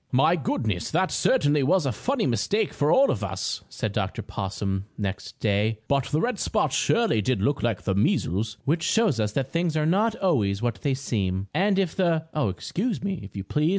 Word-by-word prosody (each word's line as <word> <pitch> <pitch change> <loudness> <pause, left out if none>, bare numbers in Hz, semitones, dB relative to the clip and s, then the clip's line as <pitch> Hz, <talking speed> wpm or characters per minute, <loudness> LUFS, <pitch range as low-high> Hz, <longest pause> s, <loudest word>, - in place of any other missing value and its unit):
"My 150 +7 +4
goodness! 110 - -2
That 185 +3 +1
certainly 150 - +2
was 165 +4 +2
a 135 - +1
funny 255 - -1
mistake 185 - 0
for 145 +2 +1
all 275 +1 +5
of 110 - -3
us," 95 -1 -3
said - - -3
Dr. - - -2
Possum 95 0 -3
next 100 -2 -5
day. 105 +1 +1
"But 140 -2 +1
the 150 - 0
red 245 +8 -1
spots - - 0
surely 230 - +2
did 125 +2 0
look 140 +8 0
like 115 -5 -1
the 95 - 0
measles." 105 - 0
Which 160 +4 +1
shows 180 - +2
us 105 -1 0
that 135 +2 -2
things 165 -2 0
are 155 - +1
not 205 +7 +2
always 110 - +1
what 115 -3 -2
they 135 -2 +1
seem. 100 -7 -2
And 195 +1 +2
if 190 -4 0
the 165 -4 +1
Oh, 150 -8 +1
excuse 200 - -3
me, 195 -4 -2
if 100 - -11
you 100 - -4
please. 150 +10 +1
140 Hz, 205 wpm, -25 LUFS, -, -, all